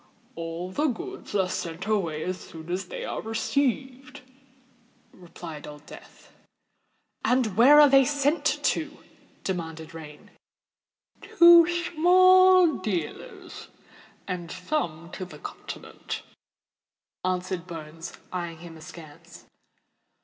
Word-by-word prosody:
"All 165 +2 -6
the 295 +10 0
goods 295 - -6
are 190 -2 +2
sent 175 0 -5
away 175 -8 -1
as 185 0 -3
soon 160 +1 -10
as 180 +1 -3
they - - -6
are - - -4
received," 260 +3 -2 0.9
replied 170 -3 -10
Old 150 0 -11
Death. - - -15 0.9
"And 250 -6 +1
where 270 +7 +8
are 295 - +9
they 270 0 +6
sent 285 +3 0
to?" - - -1 0.5
demanded 165 -4 -5
Rain. 150 -2 -11 0.9
"To 340 -1 +7
the - - -1 0.2
small 370 0 +6
dealers—and 180 -1 -7
some 175 - -3
to 185 - -6
the 175 -5 -10
continent," - - -8 1.0
answered 185 -1 -2
Bones, 165 0 -8 0.2
eyeing 170 -2 -4
him 165 0 -11
askance. 160 +1 -13
185 Hz, 105 wpm, -26 LUFS, 165-275 Hz, 1.0 s, are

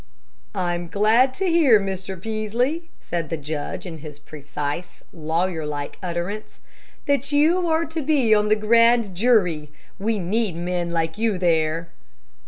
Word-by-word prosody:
"I 180 -2 0
am 175 0 -4
glad 220 +8 +3
to 385 - -1
hear, 325 - +5
Mr. 190 -1 -4
Peaslee," 230 - -2
said 170 -3 -4
the 165 - -2
judge, 150 +3 -5
in 165 -3 -7
his 150 -1 -10
precise, 150 +3 -6
lawyer 165 +1 -1
like 145 -1 -5
utterance, 180 +4 -4 0.5
"that 280 -2 0
you 330 +5 +3
are 320 +1 +2
to 320 0 -4
be 270 -6 +3
on 210 0 +3
the 215 - +5
grand 230 -1 +4
jury. 180 -8 +2 0.3
We 220 +2 0
need 200 +1 -1
men 175 0 -2
like 165 +2 -2
you 220 -3 +1
there." 165 -1 +1
190 Hz, 150 wpm, -23 LUFS, 165-235 Hz, 0.5 s, hear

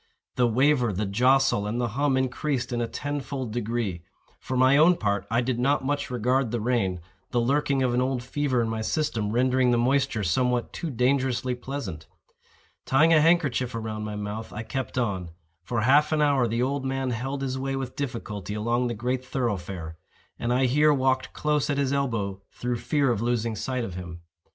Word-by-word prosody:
The 125 -1 +3
waver, 125 0 +3
the 105 +2 -2
jostle, 125 +1 +3
and 115 +3 -2
the 120 -1 0
hum 135 +3 +1
increased 130 -1 -1
in 120 - 0
a 115 - -1
tenfold 140 -4 -4
degree. 115 -6 -2 0.4
For 130 - -3
my 130 +2 +5
own 160 +5 +6
part 100 - -1
I 115 +2 +2
did 125 -1 -1
not 135 +2 +1
much 145 0 -1
regard 125 +1 +1
the 120 +1 -2
rain—the 95 -2 -2
lurking 135 +2 +1
of 125 -2 +1
an 125 - +2
old 130 -1 -1
fever 130 -2 0
in - - -1
my 110 0 -2
system 115 -4 -1
rendering 125 +2 +2
the 120 - +3
moisture 130 -2 +1
somewhat 125 +7 0
too 170 - -4
dangerously 130 -1 +1
pleasant. 120 - -6 0.8
Tying 155 +5 +5
a 155 - +6
handkerchief 140 -7 +2
about 110 -1 -4
my 105 0 -4
mouth, 105 +2 -5
I 110 - -5
kept 130 +2 -4
on. 95 -8 -1 0.3
For 115 +5 -2
half 145 +7 +4
an 155 - +2
hour 140 -5 +3
the 115 +2 0
old 140 +1 -1
man 135 -1 -1
held 135 +4 -3
his 130 -1 -2
way 135 0 -2
with 130 -2 -4
difficulty 105 -7 -4
along 120 +3 0
the 120 - -3
great 125 +4 -2
thoroughfare; 95 -10 -3 0.4
and 120 - -1
I 130 +2 +3
here 150 +4 +4
walked 130 -2 +1
close 150 -2 0
at 145 - 0
his 140 -1 +1
elbow 110 -8 -1
through 125 0 -3
fear 140 +1 +1
of 110 - -1
losing 115 -1 0
sight 130 +2 -2
of 105 -6 -5
him. 85 -2 -8
125 Hz, 190 wpm, -26 LUFS, 110-135 Hz, 0.8 s, own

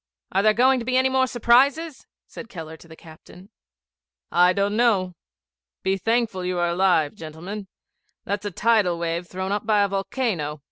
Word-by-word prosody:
'Are 195 - +2
there 215 +1 +3
going 260 +3 +4
to 230 - -6
be 255 +1 +1
any 260 0 +3
more 260 0 +2
surprises?' 270 +6 +2 0.2
said 230 - -11
Keller 160 -6 -8
to 165 - -17
the 160 - -13
captain. 175 +5 -16 0.8
'I 180 +1 +4
don't 200 +1 0
know. 205 -6 +2 0.7
Be 190 0 +1
thankful 225 -1 -1
you 180 0 -2
are 175 0 +1
alive, 170 -4 +2
gentlemen. 175 +6 -8 0.6
That's 205 +1 -3
a - - -2
tidal 205 -3 +1
wave 170 +1 -3
thrown 185 +2 -4
up 210 +1 -2
by 210 -2 +3
a - - +2
volcano. 195 - -3
195 Hz, 175 wpm, -23 LUFS, 175-230 Hz, 0.8 s, going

